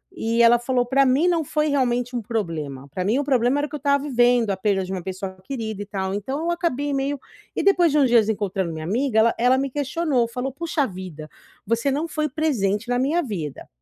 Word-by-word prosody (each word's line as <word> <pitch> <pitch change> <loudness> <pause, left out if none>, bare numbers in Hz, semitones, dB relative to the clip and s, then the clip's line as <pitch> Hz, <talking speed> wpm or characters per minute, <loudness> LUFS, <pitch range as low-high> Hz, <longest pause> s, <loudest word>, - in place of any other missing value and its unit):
E 230 -5 +1
ela 235 +1 +6
falou: 245 0 0
"Para 275 +2 +3
mim 275 +7 +3
não 335 -3 +2
foi 300 +2 0
realmente 245 -3 0
um 240 - -1
problema, 160 - -4
para 180 +6 -3
mim 225 +6 +2
o 290 - 0
problema 260 0 +2
era 295 - -3
que - - -20
eu - - -2
estava 280 0 +1
vivendo 245 -5 +3
a 195 - -2
perda 190 0 +1
de 190 - -7
uma 185 - -3
pessoa 190 0 -6
querida 220 -4 -5
e - - -11
tal, 190 -2 -3
então 235 +8 -3
eu 345 - +1
acabei 290 -5 -1
meio" 275 +1 -1 0.4
E - - -1
depois 355 -5 +4
de 300 - +2
uns 270 - +5
dias 225 -2 +4
encontrando 195 -4 -1
minha 155 0 -6
amiga 230 +4 +1
ela 230 +1 +4
ela 250 +2 +4
me 275 +1 -1
questionou, 285 -2 0
falou: 250 +3 -4
"Puxa 315 0 -1
vida, 180 -5 -8 0.4
você 230 +5 0
não 300 +4 -1
foi 305 -1 -2
presente 240 -8 -1
na 245 0 +1
minha 315 +7 +1
vida". 170 - -5
245 Hz, 230 wpm, -23 LUFS, 205-280 Hz, 0.4 s, ela